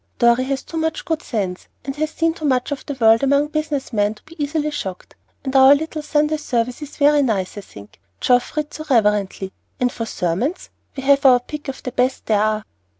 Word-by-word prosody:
Dorry 235 +1 +4
has 270 0 -2
too 330 - -7
much 320 0 -2
good 325 -1 -1
sense, 190 - -3 0.2
and 275 0 -4
has 310 +1 0
seen 330 +1 0
too 320 - -11
much 260 -2 +1
of 285 - -3
the 285 - -3
world 225 -2 +5
among 280 +2 +2
business 300 -4 -3
men 205 0 +1
to - - -21
be 320 -1 -6
easily 300 +1 -1
shocked. 190 -11 -6 0.3
And 265 0 -4
our 265 +1 +8
little 315 +1 -4
Sunday 300 +1 +1
service 245 -3 -2
is 295 -1 -9
very 290 0 +5
nice, 205 -8 -1
I 205 - -6
think; 100 - -14 0.2
Geoff 245 +4 +2
reads 300 -1 -3
so 310 - -7
reverently, 210 -5 +1 0.3
and 250 0 +1
for 230 -2 -5
sermons, 195 - -2 0.3
we 270 - -4
have 280 0 +4
our 255 -2 +7
pick 295 +4 -8
of 270 - -6
the 255 - -4
best 250 +2 0
there 210 -2 +2
are." 215 0 0
265 Hz, 215 wpm, -20 LUFS, 225-300 Hz, 0.3 s, our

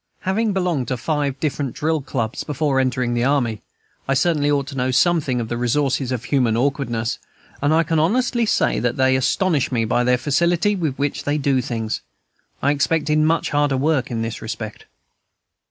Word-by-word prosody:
Having 210 +3 0
belonged 180 -9 0
to 130 - -2
five 145 0 -1
different 145 -4 -2
drill 160 0 0
clubs 120 -4 -3
before 145 -2 0
entering 125 -2 0
the 120 0 0
army, 125 -5 +1 0.5
I 135 - +1
certainly 150 0 +2
ought 140 -2 +1
to 140 - -8
know 130 -1 0
something 145 -2 +2
of 115 - -3
the 120 - -3
resources 130 +1 0
of 125 -2 -2
human 125 -6 +1
awkwardness, 120 -3 -1 0.4
and 145 +2 +2
I 165 +1 +4
can 165 -1 0
honestly 235 +7 +1
say - - +2
that 120 -1 -1
they 130 0 +3
astonish 145 +3 +1
me 115 -3 +1
by 120 +2 +1
the 125 0 +3
facility 170 +9 +1
with 160 -8 -2
which 145 0 -2
they 145 +1 +1
do 135 -3 +1
things. 115 -3 -3 0.6
I 140 - +4
expected 150 +1 +1
much 160 +2 +1
harder 145 -2 +2
work 145 -1 +1
in 115 -2 -2
this 115 0 -5
respect. 110 -1 -6
140 Hz, 185 wpm, -21 LUFS, 125-155 Hz, 0.6 s, I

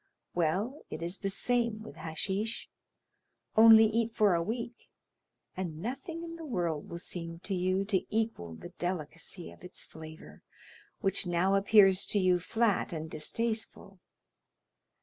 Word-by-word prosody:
Well, 190 - 0
it 165 - -5
is 175 +3 -3
the 195 - -2
same 230 +1 0
with 220 - -10
hashish; 195 +7 -3 0.9
only 225 0 +9
eat 225 +1 0
for 205 -3 +4
a 170 - +2
week, 235 +5 -5 0.7
and 175 -4 -4
nothing 320 - -5
in 335 0 -7
the 330 - -8
world 175 - -2
will 170 - -5
seem 165 -1 -6
to 200 - -2
you 185 +1 +1
to 195 -2 +1
equal 215 - -2
the 175 - -9
delicacy 175 0 -4
of - - -17
its 180 - -9
flavor, 160 0 -12 0.6
which 195 -1 +1
now 175 +3 +2
appears 195 -1 +6
to 205 - +2
you 185 -2 +3
flat 220 +3 +1
and 160 0 -5
distasteful. 220 +3 -2
195 Hz, 145 wpm, -31 LUFS, 170-225 Hz, 0.9 s, only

